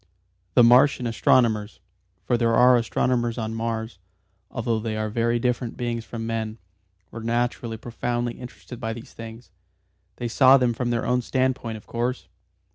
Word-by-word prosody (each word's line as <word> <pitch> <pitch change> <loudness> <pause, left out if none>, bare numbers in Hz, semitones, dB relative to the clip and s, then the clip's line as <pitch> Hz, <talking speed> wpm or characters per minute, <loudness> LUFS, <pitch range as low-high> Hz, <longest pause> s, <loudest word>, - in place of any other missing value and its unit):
The 120 - +7
Martian 125 +2 +5
astronomers 115 -2 +2 0.4
for 120 - +1
there 115 -1 +2
are 125 +2 +6
astronomers 120 0 0
on 110 -1 -3
Mars, 115 -2 -3 0.5
although 115 -1 -1
they 110 0 -3
are 110 0 -2
very 115 +1 +1
different 120 0 -2
beings 120 -2 -2
from 115 -1 -6
men 110 -1 -3 0.5
were 115 - -7
naturally 115 0 -1
profoundly 120 +1 -3
interested 125 -1 -10
by 115 -2 -3
these 115 0 -11
things. 115 +1 -10 0.6
They 120 - -4
saw 130 +3 +6
them 125 -2 +1
from 120 +1 -2
their 120 -1 -1
own 125 0 +1
standpoint 130 -3 -1
of 105 - -14
course. 120 +2 -3
115 Hz, 155 wpm, -24 LUFS, 115-125 Hz, 0.6 s, The